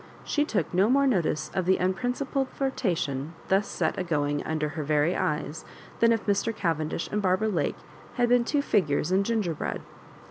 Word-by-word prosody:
She 295 0 +1
took 195 - -1
no 190 +4 +3
more 280 +2 +4
notice 180 - 0
of 185 - -1
the 190 - +4
unprincipled 250 +8 -1
flirtation 170 - -2
thus 195 +2 +3
set 160 -3 -1
agoing 145 -5 0
under 155 -1 -1
her 155 +1 -4
very 150 +4 +2
eyes, 150 +1 -2 0.4
than 230 0 +5
if 225 -2 0
Mr. 205 +2 +1
Cavendbh 165 -6 -2
and 210 - +1
Barbara 190 +3 +2
Lake 180 -6 -1 0.4
had 245 -1 +2
been 245 0 +4
two 285 +4 0
figures 160 - +1
in 190 +1 +3
ginger 210 -6 0
bread. 150 - -4
185 Hz, 175 wpm, -27 LUFS, 155-230 Hz, 0.4 s, than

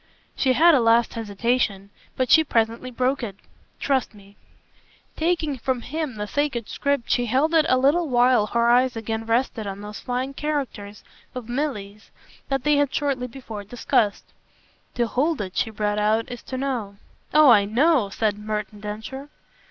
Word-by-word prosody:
She 260 -2 +2
had 335 +5 +6
a 280 - +5
last 230 0 +3
hesitation, 215 -2 -1 0.3
but 255 -1 0
she 320 - +7
presently 230 -2 0
broke 255 +2 0
it. 210 -5 -5 0.4
"Trust 265 -5 0
me." 200 0 -17 0.8
Taking 315 -4 -1
from 255 0 -1
him 300 -1 -4
the 210 -1 -4
sacred 240 0 -2
script 280 -4 -1
she 245 -1 +1
held 275 +8 +1
it 320 -1 +4
a 255 - +4
little 295 +5 +2
while 245 -3 +4
her 235 +2 +1
eyes 245 +1 +3
again 225 0 -4
rested 230 -2 0
on 195 0 -6
those 210 0 -8
fine 255 +2 -3
characters 270 -9 -4 0.3
of 250 -3 -6
Milly's 230 -6 -4 0.4
that 270 -2 -1
they 295 -1 +3
had 285 -2 +2
shortly 275 -3 -1
before 230 -5 -8
discussed. 210 -1 0 0.7
"To 240 - +1
hold 280 +7 0
it," 190 -2 -5
she 225 - 0
brought 210 -1 -1
out, 220 +3 +1
"is 245 - -7
to 260 - -5
know." 250 -7 -3 0.4
"Oh 300 -3 +7
I 205 -3 +5
KNOW!" 250 +1 +2
said 210 +1 -1
Merton 210 0 -4
Densher. 220 +7 -7
245 Hz, 165 wpm, -23 LUFS, 215-275 Hz, 0.8 s, she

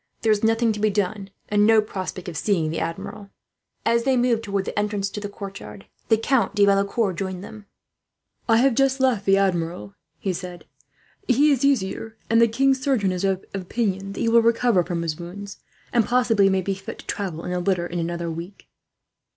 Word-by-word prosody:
There 220 - +3
is 210 0 +1
nothing 225 +1 +3
to 210 - -6
be 215 +1 +2
done, 200 0 -2 0.2
and 205 0 +2
no 225 -1 +6
prospect 190 -3 -4
of 175 - -6
seeing 165 -1 0
the 165 - -2
Admiral." 165 +4 -5 0.6
As 235 +1 +2
they 265 0 +2
moved 240 -2 +2
towards 200 -3 -2
the - - -2
entrance 205 -1 -1
to - - -5
the 205 -1 -5
courtyard, 200 0 -9 0.2
the 220 - +5
Count 235 0 +1
de 205 -1 +5
Valecourt 200 0 +1
joined 190 0 -4
them. 210 -1 -11 0.8
"I 225 - +6
have 260 +2 +4
just 270 +2 +2
left 250 -6 +1
the 195 0 +5
Admiral," 170 - -1 0.2
he 190 - -2
said. 180 0 -7 0.6
"He 280 +4 +4
is 275 -1 +1
easier, 225 -4 0
and 230 0 +5
the 230 - +6
king's 265 +3 +2
surgeon 255 -9 +1
is 180 0 -3
of 195 -1 0
opinion 195 0 -2
that - - -5
he - - +1
will 230 0 +6
recover 230 -4 +3
from 170 -1 -3
his 160 -1 -3
wounds, 195 +4 -8 0.3
and 235 -2 +4
possibly 230 -5 +3
may 190 0 +1
be 195 - -1
fit 195 0 -8
to - - -13
travel 180 -5 -4
in - - -4
a 180 - -1
litter, 180 -1 0
in 175 0 -4
another 170 0 -3
week." 170 +4 -9
200 Hz, 205 wpm, -23 LUFS, 185-230 Hz, 0.8 s, no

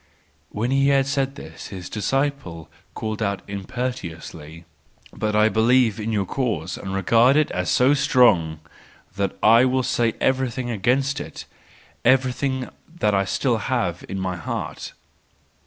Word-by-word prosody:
—When 115 +4 -2
he 135 0 +3
had 135 -1 +3
said 135 0 -1
this, - - -10
his 95 -4 -8
disciple 110 - -2 0.2
called 110 0 -4
out 100 -2 -1
impetuously: 90 -7 -6 0.5
"But 105 -1 -2
I 105 +1 +5
believe 110 +1 +3
in 110 +1 -3
your 100 -3 0
cause, 90 - -2
and 95 - -7
regard 115 +7 +4
it 155 - +2
as 90 0 -2
so 130 +3 +4
strong 95 - +3 0.5
that 100 -1 -2
I 115 +3 +7
will 130 0 +1
say 115 -2 0
everything 130 -2 0
against 135 +7 +1
it, 145 - -8 0.6
everything 130 +1 +1 0.3
that 105 -1 +2
I 100 0 +2
still 120 +4 0
have 100 -7 -2
in 95 - -4
my 95 -1 -3
heart." 85 - -5
115 Hz, 140 wpm, -23 LUFS, 95-130 Hz, 0.6 s, I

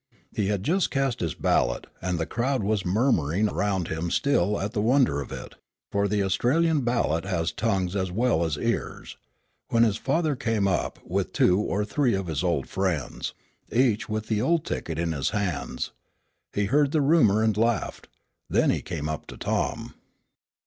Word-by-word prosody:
He 100 - 0
had 100 -2 -1
just 180 +4 +1
cast 135 -3 0
his 85 -3 -2
ballot, - - +1 0.2
and 90 0 -1
the 80 - -1
crowd 125 +4 -1
was 105 -1 0
murmuring 100 - +2
around 95 -4 -1
him 80 +2 -2
still 105 -3 +1
at 100 +2 -3
the 105 - 0
wonder 115 - +3
of - - -8
it - - -7 0.4
for 100 0 +1
the 100 0 +1
Australian 140 - +2
ballot 120 -10 0
has 90 -3 -1
tongues 95 -4 -1
as 95 -2 -1
well 115 -3 +2
as 80 -3 -1
ears - - -3 0.5
when 115 0 +3
his 110 -2 +2
father 155 +1 0
came 115 -5 0
up, 95 -3 -1
with - - -2
two 90 +2 +4
or 105 0 -1
three 125 0 +1
of 95 -1 -2
his 80 -1 -2
old 85 -7 0
friends, 90 -9 -2 0.4
each 115 -3 +2
with 110 0 -2
the 110 -2 0
old 165 +5 +1
ticket 80 -2 -3
in 85 0 0
his 70 -4 -1
hands. 95 -9 -2 0.6
He 105 - 0
heard 140 +6 +2
the 155 - +3
rumor 125 -9 +4
and 110 -2 +2
laughed. 115 0 0 0.4
Then - - +3
he - - -1
came 75 - -4
up 80 -1 -4
to - - -9
Tom. - - -2
105 Hz, 180 wpm, -26 LUFS, 90-120 Hz, 0.6 s, two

